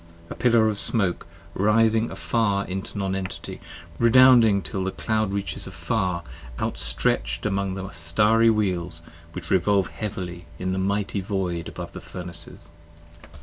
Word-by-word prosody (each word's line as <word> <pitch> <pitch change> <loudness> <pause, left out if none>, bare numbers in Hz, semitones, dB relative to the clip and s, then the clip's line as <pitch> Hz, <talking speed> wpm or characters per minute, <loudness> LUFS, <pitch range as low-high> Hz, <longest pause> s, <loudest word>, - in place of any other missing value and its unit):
A - - -5
pillar 115 -3 +3
of 105 -2 0
smoke 100 -8 +1 0.3
writhing 110 +2 +2
afar 100 -4 0
into 95 +2 -6
Non 95 -1 -1
Entity, 95 -1 -6 0.4
redounding 115 -4 +6
Till 95 - -3
the 95 - -1
cloud 110 +1 -1
reaches 100 0 -3
afar 85 0 -2 0.4
outstretch'd - - +2
among 100 -2 -1
the 95 0 -5
Starry 105 +7 +3
Wheels 90 -6 -1 0.3
Which - - -7
revolve 95 +1 +2
heavily 90 -5 -6
in 95 +2 -2
the 95 - -1
mighty 100 +1 -1
Void 90 -4 -3
above - - -7
the - - -9
Furnaces. 90 -1 -7
100 Hz, 135 wpm, -24 LUFS, 90-110 Hz, 0.4 s, redounding